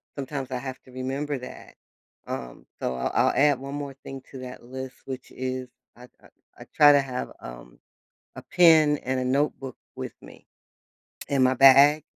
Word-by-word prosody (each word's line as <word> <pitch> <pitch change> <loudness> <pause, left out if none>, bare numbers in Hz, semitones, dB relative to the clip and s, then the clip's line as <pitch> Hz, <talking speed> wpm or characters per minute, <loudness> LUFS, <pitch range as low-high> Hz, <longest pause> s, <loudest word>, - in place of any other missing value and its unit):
sometimes 135 -1 -5
I 130 - -2
have 130 0 -7
to 130 - -18
remember 135 +3 -3
that, 125 - -11 0.5
um, 60 -2 -7 0.2
so 65 - -2
I'll 65 - -2 0.2
I'll - - +2
add 145 -2 +3
1 140 +1 -7
more 145 -1 -5
thing 135 0 -8
to 135 - -9
that 125 -1 -9
list, 130 +1 -8
which 130 -1 -7
is 130 0 -4 0.3
I 125 - -15 0.2
I - - -18 0.3
I - - -10
try 145 -1 +8
to 140 - +5
have, 130 -2 -5
um, - - -11 0.6
a - - -8
pen 160 -4 +5
and 130 0 -2
a 130 - -2
notebook 135 0 -1 0.2
with - - -6
me - - -15 0.8
in 135 -2 +2
my 130 - +4
bag, 140 +3 +7
130 Hz, 175 wpm, -25 LUFS, 130-140 Hz, 0.8 s, try